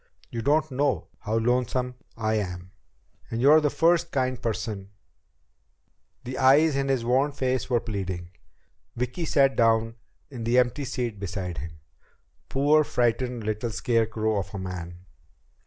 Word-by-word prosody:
You 115 - -3
don't 150 +4 +2
know 140 +1 0
how 110 +1 -1
lonesome 125 +2 0 0.2
I 110 -1 0
am. 90 -3 -3 0.6
And 115 - -3
you're 145 +5 +6
the 150 - +2
first 170 +2 +2
kind 130 -2 -1
person 105 -3 -3 0.7
..." - - -46
The 130 +1 -5
eyes 140 +3 +5
in 140 0 0
his 130 -4 0
worn 130 +4 +2
face 130 -3 -1
were 120 -2 +3
pleading. 95 -6 -5 0.6
Vicki 125 +8 -2
sat 135 -3 +3
down 115 -1 +3 0.4
in 120 -4 -6
the 120 +2 +2
empty 125 +3 +2
seat 120 -5 -3
beside 90 -2 -4
him. 80 -1 -9 0.7
Poor, 145 +3 +4
frightened 120 -2 0
little 110 +2 -2
scarecrow 110 -1 0
of 95 +1 -6
a - - -3
man! 90 -1 -7
120 Hz, 145 wpm, -26 LUFS, 105-135 Hz, 0.7 s, you're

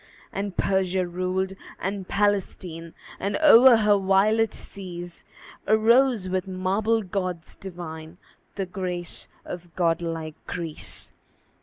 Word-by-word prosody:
And 195 -1 -4
Persia 190 -1 +1
ruled 185 +2 -2 0.3
and 195 0 -3
Palestine; 185 -5 -1 0.2
And 200 +1 -1
o'er 260 -5 +8
her 210 -2 +4
violet 205 +3 +3
seas 175 -3 -8 0.4
Arose, 225 0 +4
with 185 +1 -1
marble 195 +4 0
gods 180 -3 -4
divine, 170 -3 -8 0.4
The 195 - -2
grace 180 -2 -4 0.2
of 175 -1 -8
god 170 -2 +2
like 165 -2 -4
Greece. 165 -4 -2
185 Hz, 110 wpm, -25 LUFS, 175-205 Hz, 0.4 s, o'er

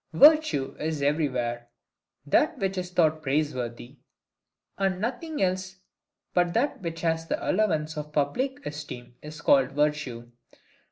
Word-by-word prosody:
Virtue 165 - +5
is 155 -2 -2
everywhere, 125 -5 0 0.6
that 295 - +2
which 195 -4 -1
is 180 -1 -3
thought 160 -3 +2
praiseworthy; 135 -3 -2 0.8
and 190 -2 +1
nothing 265 - -2
else 185 0 -1 0.6
but 175 -1 +2
that 265 +1 +1
which 165 -2 -5
has 165 -1 0
the - - 0
allowance 160 -7 +1
of 150 0 -5
public 255 - -1
esteem 145 -5 -7
is 150 0 -9
called 135 -2 +4
virtue. 145 -5 -1
155 Hz, 125 wpm, -27 LUFS, 140-190 Hz, 0.8 s, Virtue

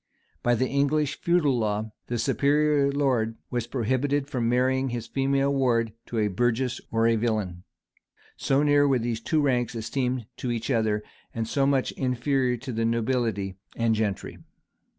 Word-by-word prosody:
[] - - -41
By 120 0 +2
the 130 +3 +1
English 145 +1 0
feudal 155 -8 +2
law, 105 0 -1 0.2
the 120 - -2
superior 145 +3 +2
lord 130 -6 +1 0.2
was 120 -2 -2
prohibited 135 +3 0
from 120 -5 -1
marrying 130 +2 +2
his 120 -2 -4
female 135 +2 +1
ward 115 -5 +1
to 120 - -4
a 105 -1 +2
burgess 120 +4 0
or 115 0 +1
a 115 0 +4
villain;[] 105 -6 -1 0.7
so 135 +2 +1
near 145 -1 +4
were 135 -2 +3
these 115 -1 -2
two 155 +5 +1
ranks 125 -4 +1
esteemed 125 +1 -2
to 125 - -3
each 120 +2 -2
other, 110 -3 +1 0.3
and 115 -1 -2
so 135 +3 +1
much 135 -2 +1
inferior 125 0 0
to 130 +3 -7
the 115 -1 -1
nobility 115 -4 -1 0.2
and 115 -1 +2
gentry. 105 -3 -2
125 Hz, 165 wpm, -26 LUFS, 115-135 Hz, 0.7 s, a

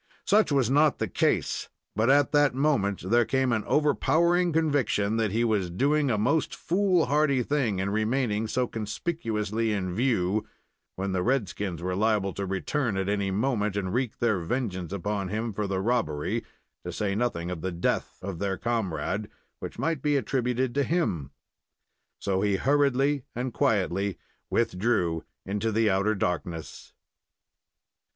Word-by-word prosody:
Such 210 -3 +4
was 135 -4 +3
not 150 +2 +4
the - - -1
case; - - 0 0.3
but 110 +4 +2
at 145 +1 +4
that 145 -3 +3
moment 100 - +1
there 120 0 +5
came 130 +1 +1
an 110 -2 +1
overpowering 170 +4 +2
conviction 140 -9 +1
that 110 -2 +1
he 115 +3 +1
was 105 -6 +1
doing 140 - +1
a 110 - +1
most 140 +10 +1
foolhardy 155 -8 +2
thing 125 -8 0
in 95 +1 -1
remaining 110 0 0
so 125 +3 0
conspicuously 110 - -2
in 95 -3 -2
view, 110 -3 +1 0.5
when 95 +1 -2
the 95 -1 0
red 125 0 +1
skins 90 -5 -4
were 90 0 -1
liable 105 -2 +1
to 100 -1 -4
return 105 +4 -1
at 95 0 -1
any 100 -1 0
moment 105 0 0
and 95 -2 -2
wreak 125 -1 -1
their 110 -5 +1
vengeance 95 -2 -3
upon 100 0 -2
him 110 +3 -3
for 105 0 -2
the 95 -1 -1
robbery, 95 -9 0 0.4
to - - -5
say 100 -2 -1
nothing 100 -6 -1
of 85 -3 -5
the 95 +2 -2
death, 85 0 -1
of 95 -3 -5
their 100 -1 -1
comrade, 110 -2 -2 0.3
which - - -7
might 165 -4 -1
be 145 0 +2
attributed 125 0 0
to 140 - +1
him. 140 - 0 0.9
So 95 -1 -1
he 100 -1 +2
hurriedly 140 +2 +2
and 125 0 -3
quietly 100 -2 +1 0.3
withdrew 90 -6 +1 0.2
into 105 +3 -1
the 110 -1 +2
outer 100 +3 +2
darkness. 85 -3 -4
110 Hz, 155 wpm, -27 LUFS, 95-135 Hz, 0.9 s, there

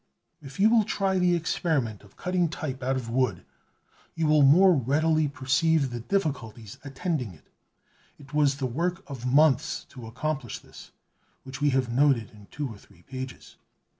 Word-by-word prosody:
If 140 +4 -11
you 215 +3 +5
will 230 -2 +5
try 195 -2 0
the 180 -1 +3
experiment 155 - -1
of 100 - -20
cutting 180 -2 0
type 140 -4 -5
out 130 +1 0
of 130 -3 -4
wood, 115 -6 -1 0.7
you 165 -1 0
will 150 -1 +4
more 180 +7 +7
readily 155 +3 +2
perceive 140 +1 +1
the 120 - -4
difficulties 115 - -3
attending 135 - -3
it. - - -23 0.7
It 140 -2 -16
was 145 -2 +3
the 135 - -2
work 175 +9 -2
of 125 -3 -4
months 155 +2 +3
to 125 -4 -10
accomplish 135 +1 -4
this, - - -14 0.5
which 135 +1 -9
we 145 - +3
have 125 -3 -1
noted 130 -4 +2
in 105 -2 -16
two 150 -1 -4
or 110 -5 -10
three 85 - -22
pages. 130 +2 -8
140 Hz, 165 wpm, -26 LUFS, 125-160 Hz, 0.7 s, more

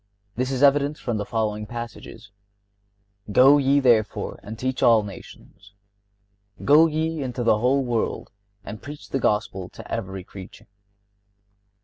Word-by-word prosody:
This 125 +2 -1
is 135 0 -1
evident 145 +1 +3
from 120 -3 -3
the 105 - -3
following 105 -2 -2
passages: 120 -2 -9 1.0
"Go 135 +7 +6
ye, 140 +1 +3
therefore, 115 -5 +1
and 110 +2 -9
teach 130 +2 -3
all 115 -2 +5
nations."(58) 100 0 -16
"Go 155 +3 +6
ye 160 0 -2
into 125 -2 -3
the 110 -2 +3
whole 130 +3 +2
world, 120 -2 -2 0.3
and 105 - -8
preach 145 +1 -10
the 135 - -1
Gospel 95 -5 -1
to - - -12
every 95 0 -4
creature." 95 0 -12
115 Hz, 135 wpm, -23 LUFS, 100-135 Hz, 1.0 s, Go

